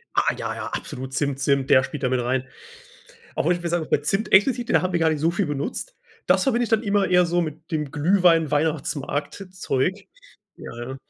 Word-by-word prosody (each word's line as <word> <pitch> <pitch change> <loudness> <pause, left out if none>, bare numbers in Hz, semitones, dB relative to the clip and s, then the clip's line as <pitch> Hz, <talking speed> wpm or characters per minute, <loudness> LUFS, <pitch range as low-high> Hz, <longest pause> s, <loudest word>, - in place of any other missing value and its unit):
Ah - - +2
ja, - - -3
ja, - - -5
absolut. 130 +1 -6
Zimt, 140 -1 -1
Zimt, 140 -2 +1
der 130 -2 +6
spielt 145 0 -6
da 125 - +2
mit 130 -1 0
rein. 130 +1 -1 0.9
Auch - - -1
wenn 175 - +4
ich 175 - -10
mir 170 - -2
sagen 170 -1 0
muss, - - -17
bei - - +3
Zimt 195 +9 -2
explizit, 240 +4 +4
da - - +3
haben 185 0 -1
wir 170 - 0
gar 165 - +3
nicht 155 -2 -1
so 165 +2 +2
viel 180 +1 -1
benutzt. 150 - -4 0.3
Das - - +3
verbinde 245 -3 +1
ich - - -5
dann 225 0 +2
immer 200 -2 +1
eher 180 0 +4
so 175 +1 0
mit 160 0 -6
dem 150 -3 -2
Glühwein-Weihnachtsmarkt-Zeug. 160 +1 0 0.5
Ja, - - -9
ja. 130 +2 -6
160 Hz, 215 wpm, -23 LUFS, 140-185 Hz, 0.9 s, der